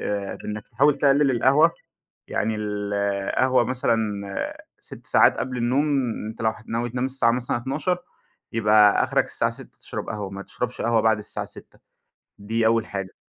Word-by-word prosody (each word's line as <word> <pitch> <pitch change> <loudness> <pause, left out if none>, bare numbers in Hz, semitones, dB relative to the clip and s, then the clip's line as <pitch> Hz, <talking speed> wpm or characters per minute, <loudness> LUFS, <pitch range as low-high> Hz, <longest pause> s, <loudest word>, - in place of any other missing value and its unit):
آآ، 100 -1 -3
بإنك 105 0 -7
تحاول 140 +5 +3
تقلل 140 0 +4
القهوة 140 +7 +4 0.6
يعني 110 0 -1
ال 105 -1 -3
القهوة 100 +6 +1
مثلًا 110 -5 -2
6 - - -10
ساعات - - +4
قبل 125 0 -3
النوم 125 +5 +1 0.4
أنت 110 +1 -8
لو 110 - +3
هت 110 0 -13
ناوي 120 +1 -1
تنام 125 +1 -2
الساعة 130 -3 +2
مثلًا 125 0 -1
00:00 150 +9 -1 0.5
يبقى 105 -2 +5
أخرك - - +1
الساعة - - -1
18:00 - - -10
تشرب - - -6
قهوة، 105 -2 -4
ما 100 0 -7
تشربش 125 +4 -5
قهوة 115 -1 +3
بعد 110 -1 +3
الساعة 105 - -5
18:00 - - -11 0.6
دي 110 +2 -1
أول 115 -1 +3
حاجة، 95 -2 -5
115 Hz, 165 wpm, -24 LUFS, 105-130 Hz, 0.6 s, يبقى